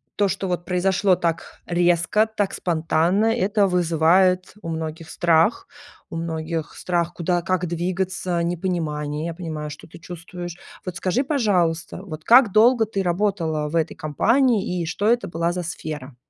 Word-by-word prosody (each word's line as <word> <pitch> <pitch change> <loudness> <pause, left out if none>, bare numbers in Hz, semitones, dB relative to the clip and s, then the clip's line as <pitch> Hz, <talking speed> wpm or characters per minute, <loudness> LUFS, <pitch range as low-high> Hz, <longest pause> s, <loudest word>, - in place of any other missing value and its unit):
то, 205 - +2
что 190 - -2
вот 175 -1 -2
произошло 185 +1 +2
так 165 -1 -3
резко, 175 +4 +2
так 205 -3 -2
спонтанно, 170 +4 +1
это 210 -3 +2
вызывает 180 +1 +2
у 165 - -6
многих 160 0 -5
страх, 170 +5 +2 0.4
у - - -7
многих 165 -1 -4
страх, 175 -1 -1
куда, 175 0 0
как 185 0 -1
двигаться, 180 +1 -2
непонимание. 160 -4 -2
Я 170 - -3
понимаю, 155 -3 -5
что 150 - -10
ты 170 +1 -13
чувствуешь. 175 0 -8 0.3
Вот 180 -1 -5
скажи, 190 +10 0
пожалуйста, 185 - 0
вот 155 -5 -8
как 240 -3 +6
долго 225 +1 +5
ты 200 -2 -2
работала 175 -5 0
в 165 - -5
этой 160 - 0
компании 205 - +1
и - - -2
что 200 +5 -2
это 240 +1 +2
была 170 +1 -1
за 180 0 -3
сфера? 150 -5 -6
175 Hz, 155 wpm, -22 LUFS, 165-190 Hz, 0.4 s, как